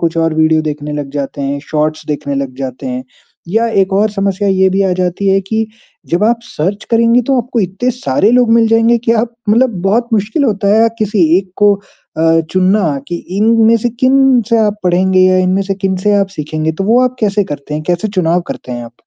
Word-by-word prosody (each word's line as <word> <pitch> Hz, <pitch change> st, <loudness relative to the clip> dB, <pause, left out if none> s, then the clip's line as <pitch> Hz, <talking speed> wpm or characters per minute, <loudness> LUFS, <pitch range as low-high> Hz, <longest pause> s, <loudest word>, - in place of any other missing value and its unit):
कुछ 165 Hz, 0 st, -1 dB
और 165 Hz, -1 st, +1 dB
वीडियो 160 Hz, 0 st, +2 dB
देखने 150 Hz, -1 st, -5 dB
लग 145 Hz, -2 st, -5 dB
जाते 140 Hz, 0 st, -5 dB
हैं, 140 Hz, +1 st, -2 dB
शॉर्ट्स 155 Hz, 0 st, -2 dB
देखने 145 Hz, -1 st, -3 dB
लग 135 Hz, -2 st, -3 dB
जाते 130 Hz, 0 st, -6 dB
हैं। 125 Hz, 0 st, -4 dB, 0.4 s
या 225 Hz, +5 st, +1 dB, 0.2 s
एक 190 Hz, +1 st, -4 dB
और 210 Hz, +2 st, +2 dB
समस्या 200 Hz, 0 st, -1 dB
ये 190 Hz, 0 st, +3 dB
भी 195 Hz, +1 st, +1 dB
आ 190 Hz, -1 st, +1 dB
जाती 185 Hz, +2 st, -1 dB
है 195 Hz, 0 st, +3 dB
कि 220 Hz, +3 st, -2 dB, 0.4 s
जब 175 Hz, +5 st, 0 dB
आप 235 Hz, +1 st, +2 dB
सर्च 195 Hz, 0 st, -4 dB
करेंगी 230 Hz, +1 st, +3 dB
तो 270 Hz, -, +3 dB
आपको 240 Hz, -1 st, -3 dB
इतने 195 Hz, +7 st, -1 dB
सारे 205 Hz, -, 0 dB
लोग 245 Hz, -1 st, +3 dB
मिल 230 Hz, -1 st, +4 dB
जाएँगे 230 Hz, +1 st, +3 dB
कि 230 Hz, 0 st, 0 dB
आप 235 Hz, -1 st, -5 dB
मतलब 235 Hz, +4 st, +3 dB
बहुत 230 Hz, +5 st, +1 dB
मुश्किल 220 Hz, +7 st, 0 dB
होता 205 Hz, -4 st, 0 dB
है 230 Hz, -, +4 dB
किसी 210 Hz, -4 st, +1 dB
एक 190 Hz, -1 st, -7 dB
को 205 Hz, -1 st, +4 dB
अ, 165 Hz, -4 st, -2 dB
चुनना 185 Hz, -5 st, +1 dB
कि 175 Hz, -, -3 dB, 0.2 s
इनमें 225 Hz, +1 st, +4 dB
से 230 Hz, +2 st, -1 dB
किन 265 Hz, -1 st, +4 dB
से 230 Hz, -1 st, +2 dB
आप 210 Hz, -1 st, +1 dB
पढ़ेंगे 185 Hz, +1 st, +2 dB
या 185 Hz, 0 st, +3 dB
इनमें 185 Hz, +1 st, +1 dB
से 195 Hz, 0 st, -3 dB
किन 190 Hz, -1 st, -2 dB
से 205 Hz, -, +3 dB
आप 195 Hz, -1 st, 0 dB
सीखेंगे, 155 Hz, +1 st, -2 dB
तो 190 Hz, +5 st, -4 dB
वो 230 Hz, +4 st, +3 dB
आप 255 Hz, 0 st, -2 dB
कैसे 205 Hz, -1 st, +1 dB
करते 145 Hz, -1 st, -6 dB
हैं? 155 Hz, -, -3 dB
कैसे 180 Hz, +4 st, -1 dB
चुनाव 180 Hz, -3 st, 0 dB
करते 125 Hz, -, -7 dB
हैं 120 Hz, -1 st, -5 dB
आप? 115 Hz, -, -12 dB
195 Hz, 220 wpm, -13 LUFS, 160-225 Hz, 0.4 s, मिल